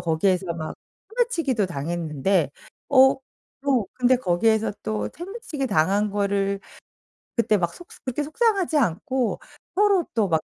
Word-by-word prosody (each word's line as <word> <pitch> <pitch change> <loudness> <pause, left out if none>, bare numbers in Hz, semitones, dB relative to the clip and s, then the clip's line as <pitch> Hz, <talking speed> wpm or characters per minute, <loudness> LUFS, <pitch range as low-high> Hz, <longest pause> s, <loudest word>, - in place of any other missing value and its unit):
거기에서 175 +1 +1
막 160 -2 -5 0.4
소매치기도 335 - +1
당했는데 165 0 0 0.4
어 265 -1 +6 0.5
또 255 -7 +2
근데 255 0 +3
거기에서 220 +1 +2
또 215 -1 -2
소매치기 345 - -4
당한 200 +4 +2
거를 200 -1 0 0.8
그때 220 -3 +3
막 175 -2 -1
속 350 - -12 0.2
그렇게 275 +4 -1
속상하지 380 0 +1
않고 255 - 0 0.3
서로 400 -2 +4
또 210 -5 +1
막 160 - +3
220 Hz, 275 characters per minute, -24 LUFS, 180-285 Hz, 0.8 s, 어